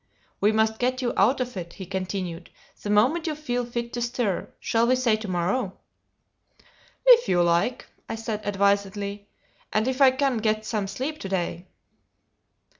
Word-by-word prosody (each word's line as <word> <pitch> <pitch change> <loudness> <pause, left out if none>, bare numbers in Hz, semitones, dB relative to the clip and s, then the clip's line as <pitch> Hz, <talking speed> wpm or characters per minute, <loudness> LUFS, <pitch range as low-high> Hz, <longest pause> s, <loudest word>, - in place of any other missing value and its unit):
"We 210 - +4
must 220 0 +1
get 255 +1 0
you 240 - 0
out 240 +8 +3
of 250 -2 -3
it," 170 -2 -6
he 190 - -8
continued, 185 -2 -4 0.3
"the 205 - -5
moment 255 +12 +3
you 310 - -1
feel 245 -5 -2
fit 235 0 -4
to 240 - -3
stir. 235 -5 -1
Shall 230 0 +1
we 255 - +4
say 250 -4 +2
to 215 -1 -7
morrow?" 185 +4 -1 1.3
"If 485 -1 +7
you 175 -1 +4
like," 175 +8 +1 0.2
I - - -2
said, 225 -1 -4
advisedly; 200 0 0 0.4
"and 215 +3 +1
if 260 +1 -1
I 270 - +9
can 260 -1 +1
get 215 0 0
some 215 -3 -2
sleep 280 +9 -4
to 195 - -6
day." 180 -1 -2
220 Hz, 170 wpm, -25 LUFS, 195-250 Hz, 1.3 s, I